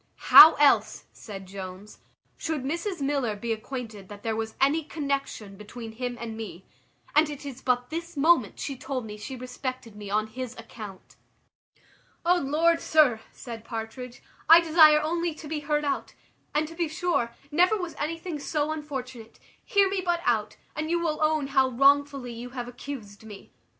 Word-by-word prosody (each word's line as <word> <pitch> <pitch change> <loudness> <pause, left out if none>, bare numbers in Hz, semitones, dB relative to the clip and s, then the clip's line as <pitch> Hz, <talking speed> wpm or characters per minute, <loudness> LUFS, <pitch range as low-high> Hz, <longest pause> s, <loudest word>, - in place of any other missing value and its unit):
"How 315 +2 +12
else," 290 -1 +3
said 195 -3 -9
Jones, 190 +1 -9 0.4
"should 315 -5 -3
Mrs 340 +5 -3
Miller 275 -6 0
be 225 +3 -2
acquainted 220 -4 -7
that 205 0 -11
there 225 -1 -1
was 220 0 -4
any 295 +4 +3
connexion 275 -9 -4
between 225 +2 -9
him 245 +2 -5
and 230 -1 -6
me? 200 -5 -8 0.5
And 305 0 +5
it 290 -1 -8
is 265 -2 -7
but 250 0 0
this 335 0 -6
moment 295 -6 +3
she 275 - -4
told 260 -2 -4
me 210 -1 -7
she 215 +5 -7
respected 255 -2 -6
me 205 -1 -8
on 215 +1 +1
his 250 +2 -7
account." 215 -4 -11 1.1
"O 355 +1 +4
Lord, 330 +3 +2
sir," 295 -8 +4
said 230 -4 -9
Partridge, 230 +2 -7 0.3
"I 330 +1 +10
desire 310 -2 +6
only 335 +1 -1
to 310 - -10
be 305 0 -3
heard 295 0 -1
out; 280 - -3 0.4
and 305 +1 +1
to 330 - -10
be 335 0 -1
sure, 310 -7 -1 0.2
never 360 +8 +4
was 355 -4 -5
anything 330 +1 -4
so 300 +1 -1
unfortunate: 260 -7 -7 0.3
hear 400 -1 +3
me 385 -1 -1
but 345 -1 0
out, 215 -3 0 0.2
and 310 +1 -3
you 345 +1 +1
will 320 -3 -1
own 310 -1 +2
how 265 -1 +2
wrongfully 275 0 +2
you 240 +2 -7
have 245 -1 -4
accused 240 -5 -9
me. 210 -2 -12
270 Hz, 170 wpm, -26 LUFS, 225-310 Hz, 1.1 s, How